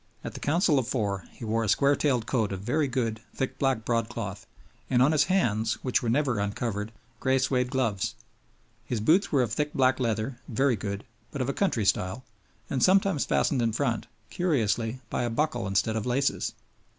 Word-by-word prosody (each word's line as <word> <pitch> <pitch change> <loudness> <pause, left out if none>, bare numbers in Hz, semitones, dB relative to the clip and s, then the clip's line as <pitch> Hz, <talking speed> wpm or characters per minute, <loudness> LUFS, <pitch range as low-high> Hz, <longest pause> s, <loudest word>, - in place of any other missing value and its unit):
At - - -5
the - - -7
Council 155 -1 +3
of 120 - -2
Four 100 -8 -1
he 115 - -9
wore 115 +1 0
a 110 - -1
square 140 +6 +4
tailed 125 -7 +1
coat 115 -5 0
of 95 -1 -4
very 145 +8 +1
good, 115 -4 -2
thick 130 - -3
black 135 -5 +1
broadcloth, 115 0 -2 0.4
and 125 - +3
on 130 +4 +5
his 150 -2 +4
hands, 115 - +1
which 130 - +1
were 120 - -1
never 130 -3 +1
uncovered, 105 +1 -2 0.3
gray 130 0 +2
suede 130 -1 +1
gloves; 125 -7 -1 0.7
his 115 0 -2
boots 165 - +3
were 135 -4 +4
of 110 -3 -3
thick 150 +3 -1
black 130 -1 +3
leather, 115 +1 -1
very 135 +1 +2
good, 100 0 -4 0.3
but 140 - -6
of 130 0 -1
a - - 0
country 125 - 0
style, 95 +5 0 0.4
and 130 0 -2
sometimes 190 -4 +4
fastened 135 -4 +1
in 115 -2 +1
front, 120 -2 -1 0.2
curiously, 120 - 0
by - - 0
a 120 - 0
buckle 150 -1 -1
instead 100 +3 +1
of 110 +1 -2
laces. 135 +3 0
125 Hz, 190 wpm, -27 LUFS, 110-140 Hz, 0.7 s, on